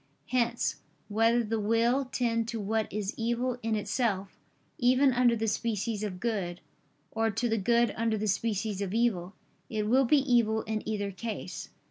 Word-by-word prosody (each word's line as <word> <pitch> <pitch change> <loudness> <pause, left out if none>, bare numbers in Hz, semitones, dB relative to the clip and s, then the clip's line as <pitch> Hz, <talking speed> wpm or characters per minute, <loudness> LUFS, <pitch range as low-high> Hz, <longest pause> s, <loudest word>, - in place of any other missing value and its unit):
Hence, 240 -2 +1 0.3
whether 225 +3 +3
the 225 0 -1
will 230 +5 +2
tend 230 -3 0
to 230 -1 -3
what 215 +1 -1
is 205 -1 -2
evil 240 +2 -1
in 225 0 0
itself, 205 -2 -1 0.4
even 255 +2 +4
under 240 -1 +4
the 225 0 -1
species 215 0 -1
of 195 -4 -4
good; 195 -6 -2 0.5
or 225 0 +1
to 240 +3 -1
the 225 -1 +1
good 235 +3 +3
under 225 -1 0
the 215 +1 -2
species 205 0 -1
of 200 +1 -2
evil, 195 -6 0 0.3
it 215 -2 -1
will 260 +4 +4
be 295 +5 +5
evil 235 -5 +2
in 215 -1 -2
either 205 -2 -2
case. 200 -1 -6
225 Hz, 165 wpm, -29 LUFS, 210-235 Hz, 0.5 s, be